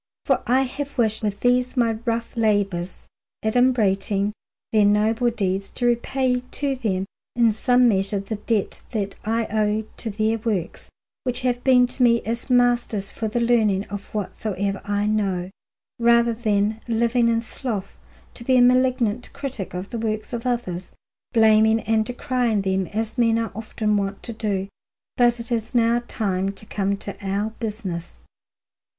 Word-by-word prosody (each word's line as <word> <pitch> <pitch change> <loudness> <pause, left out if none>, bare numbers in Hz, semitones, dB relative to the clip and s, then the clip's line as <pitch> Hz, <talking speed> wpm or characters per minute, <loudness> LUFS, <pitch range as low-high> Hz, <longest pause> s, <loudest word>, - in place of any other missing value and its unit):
For - - +2
I 255 +3 +4
have 280 +2 -5
wished 220 -3 +2
with 205 -2 -2
these 250 +1 +2
my 235 -2 +3
rough 230 0 -2
labours, 200 -5 0 0.4
adumbrating 210 -4 +2 0.4
their 215 -1 +5
noble 215 +4 +3
deeds, 195 -3 -2
to 245 - -3
repay 250 +1 +1
to 270 +2 -3
them 195 -7 -1 0.3
in 230 -2 +4
some 245 +3 +4
measure 200 -1 +1
the 200 +2 -5
debt 210 -1 -1
that 200 -3 -2
I 225 +1 0
owe 215 0 +1
to 225 - -3
their 220 +2 0
works, 210 -6 -3 0.3
which 250 0 -2
have 245 -1 0
been 250 -2 +6
to 250 +1 -5
me 235 -1 +4
as 230 +4 -4
masters 240 -5 +2
for 220 - -3
the 220 +3 -1
learning 220 -5 +2
of 205 0 -6
whatsoever 200 -1 -3
I 205 0 0
know, 195 -4 0 0.5
rather 235 0 +4
than, 215 -1 0
living 235 +1 +2
in 230 0 +1
sloth, 215 -5 -5 0.4
to 235 - -9
be 255 +1 +3
a - - +6
malignant 250 -2 +2
critic 250 -10 -5
of 185 +2 -5
the 235 - -3
works 215 +1 -3
of 235 +1 -3
others, 190 -8 -3 0.4
blaming 220 0 +5
and 220 0 +1
decrying 245 -2 0
them 190 -1 0
as 225 +3 -3
men 230 -1 +4
are 225 -2 -2
often 215 0 -1
wont 195 0 -3
to 235 - -5
do. 205 -3 -2 0.5
But 240 -1 +3
it 235 +1 -8
is 230 +1 -2
now 235 0 +3
time 195 -2 -1
to 200 - -10
come 200 -1 -1
to 200 0 -7
our 200 +3 -1
business. 205 -7 -5
220 Hz, 160 wpm, -23 LUFS, 205-240 Hz, 0.5 s, been